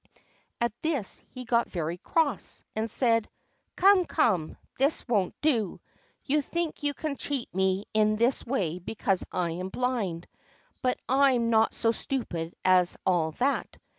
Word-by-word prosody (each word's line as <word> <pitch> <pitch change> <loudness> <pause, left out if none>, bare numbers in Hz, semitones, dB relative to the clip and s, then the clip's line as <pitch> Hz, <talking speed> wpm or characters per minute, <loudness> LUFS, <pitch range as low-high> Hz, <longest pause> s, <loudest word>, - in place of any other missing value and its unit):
At 235 -2 0
this 290 -11 -1
he 255 0 -8
got 235 0 +2
very 170 0 -3
cross, 290 - 0
and 220 +1 -1
said: 230 -1 +2 0.5
"Come, 385 -1 +5
come, 190 - +1 0.2
this 275 +2 +1
won't 205 -7 +1
do. 235 - +1 0.5
You 295 +2 +2
think 335 +3 -3
you 290 -1 -1
can 300 -3 -3
cheat 275 -4 -3
me 190 +2 +1
in 215 0 +3
this 235 +4 +2
way 180 - -1
because 195 0 0
I 175 -2 -1
am 180 +3 -4
blind; 205 -8 -2 0.5
but 250 -1 +1
I'm 260 -3 +3
not 220 0 +3
so 225 - +2
stupid 180 -10 -3
as 185 -1 +4
all 165 -4 +2
that. 270 - -1
230 Hz, 145 wpm, -28 LUFS, 185-270 Hz, 0.5 s, Come